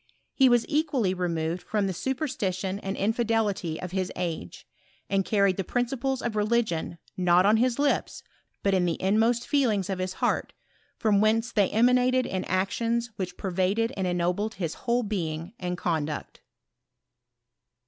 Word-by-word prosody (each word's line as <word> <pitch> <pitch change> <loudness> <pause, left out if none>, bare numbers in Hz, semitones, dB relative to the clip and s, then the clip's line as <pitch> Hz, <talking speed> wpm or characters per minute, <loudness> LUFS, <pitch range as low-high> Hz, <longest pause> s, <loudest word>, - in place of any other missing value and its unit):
He 265 -2 +5
was 240 -1 +4
equally 290 - +1
removed 170 -1 -2
from 210 -2 -1
the 190 - -1
superstition 195 - -2
and 195 -1 -4
infidelity 215 -6 0
of 180 - -6
his 185 -1 -2
age, 165 - -4 0.5
and 195 -1 +2
carried 200 -2 +2
the 195 - -1
principles 245 +4 -1
of 235 -3 -2
religion, 210 -6 0 0.2
not 180 0 +4
on 215 +2 +5
his 240 +1 +2
lips, 285 0 0 0.4
but 195 - +2
in 185 -2 +3
the 170 -2 -1
inmost 225 +5 +2
feelings 215 - +1
of 190 - -3
his 185 0 -2
heart, - - -1 0.4
from 205 -2 +3
whence 225 +2 +2
they 205 -4 +2
emanated 250 +3 +3
in 185 - -3
actions 230 +5 0
which 185 -2 -4
pervaded 195 +5 0
and 190 -2 -1
ennobled 180 +5 -1
his 170 -4 -3
whole 240 +1 0
being 170 -4 -3
and 180 -1 -3
conduct. 155 -4 -3
200 Hz, 150 wpm, -27 LUFS, 180-235 Hz, 0.5 s, He